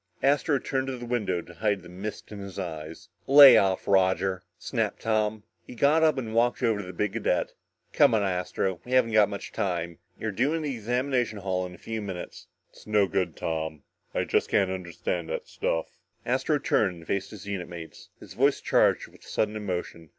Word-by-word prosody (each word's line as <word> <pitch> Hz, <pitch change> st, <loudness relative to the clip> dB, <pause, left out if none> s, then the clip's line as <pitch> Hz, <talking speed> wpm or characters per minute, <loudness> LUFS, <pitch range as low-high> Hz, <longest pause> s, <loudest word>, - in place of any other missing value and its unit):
Astro 140 Hz, +1 st, +3 dB
turned 135 Hz, 0 st, -2 dB
to 130 Hz, -1 st, -3 dB
the 120 Hz, -, -7 dB
window 105 Hz, -8 st, -1 dB
to 85 Hz, -, -13 dB
hide 100 Hz, +1 st, -1 dB
the -, -, -11 dB
mist 95 Hz, +6 st, -7 dB
in 105 Hz, -, -7 dB
his 100 Hz, -2 st, -8 dB
eyes. 80 Hz, -4 st, -6 dB, 0.2 s
"Lay 140 Hz, 0 st, +10 dB
off, 95 Hz, -1 st, +2 dB
Roger," 95 Hz, -1 st, +2 dB, 0.2 s
snapped -, -, -2 dB
Tom. 110 Hz, -1 st, 0 dB, 0.2 s
He -, -, -10 dB
got 145 Hz, +6 st, +4 dB
up 155 Hz, -3 st, +4 dB
and 115 Hz, -4 st, -4 dB
walked 120 Hz, +3 st, +2 dB
over 110 Hz, -3 st, +2 dB
to 100 Hz, -, -6 dB
the -, -, -6 dB
big 100 Hz, +2 st, -2 dB
cadet. -, -, 0 dB, 0.4 s
"Come -, -, +5 dB
on, 105 Hz, -, +2 dB
Astro, 90 Hz, -1 st, -1 dB
we 125 Hz, -, -6 dB
haven't 130 Hz, -3 st, +4 dB
got 105 Hz, -2 st, +5 dB
much 100 Hz, -1 st, -6 dB
time. 85 Hz, -3 st, -2 dB, 0.2 s
You're 110 Hz, -, -2 dB
due 130 Hz, +10 st, +1 dB
in 160 Hz, -, -2 dB
the 145 Hz, -2 st, -2 dB
examination 125 Hz, 0 st, -1 dB
hall 95 Hz, -2 st, -2 dB
in 90 Hz, -, -11 dB
a -, -, -15 dB
few 110 Hz, +3 st, -5 dB
minutes." 95 Hz, -4 st, -7 dB, 0.2 s
"It's -, -, -17 dB
no 105 Hz, -2 st, +4 dB
good, 90 Hz, -, -1 dB
Tom, 80 Hz, -2 st, -3 dB, 0.3 s
I -, -, 0 dB
just -, -, 0 dB
can't 95 Hz, -2 st, +2 dB
understand 90 Hz, -2 st, -4 dB
that -, -, -4 dB
stuff." 80 Hz, -, -1 dB, 0.4 s
Astro 130 Hz, +5 st, +1 dB
turned 105 Hz, -9 st, +1 dB
and 85 Hz, -, -13 dB
faced 100 Hz, +2 st, -2 dB
his 105 Hz, -4 st, -10 dB
unit 100 Hz, -4 st, -4 dB
mates, 85 Hz, -2 st, -10 dB
his -, -, -12 dB
voice -, -, +2 dB
charged -, -, +2 dB
with -, -, -20 dB
sudden 105 Hz, 0 st, -1 dB
emotion. 90 Hz, -5 st, -5 dB
100 Hz, 200 wpm, -27 LUFS, 90-120 Hz, 0.4 s, Lay